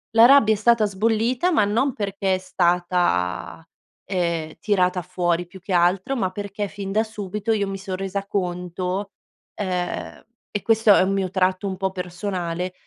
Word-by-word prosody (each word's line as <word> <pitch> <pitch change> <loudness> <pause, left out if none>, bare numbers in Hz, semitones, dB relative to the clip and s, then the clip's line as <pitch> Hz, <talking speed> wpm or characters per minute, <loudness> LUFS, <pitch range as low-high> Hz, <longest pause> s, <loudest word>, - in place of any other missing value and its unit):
La 225 +1 +9
rabbia 240 -5 +6
è - - -6
stata 230 +1 +4
sbollita 225 - +1
ma 215 - +3
non 235 +7 +1
perché 195 -2 -1
è - - -1
stata, 175 - 0 0.4
ehm, 170 -4 -2
tirata 185 -3 +1
fuori. 175 -1 -1
Più 185 +2 -13
che 190 - -8
altro 180 +8 +2
ma 190 -7 -1
perché 205 +1 -4
fin 195 0 -6
da 215 +2 +2
subito 210 0 -4
io 205 -2 +1
mi 195 0 -4
son 190 -1 -5
resa 195 +1 -3
conto, 180 0 -3 0.4
ehm, 180 -3 -4 0.3
e 205 - -2
questo 225 -2 +5
è - - +5
un 195 +1 0
mio 195 -1 0
tratto 185 +1 0
un 190 -1 -4
po' 190 0 -1
personale, 180 -1 -4
190 Hz, 170 wpm, -23 LUFS, 180-205 Hz, 0.4 s, La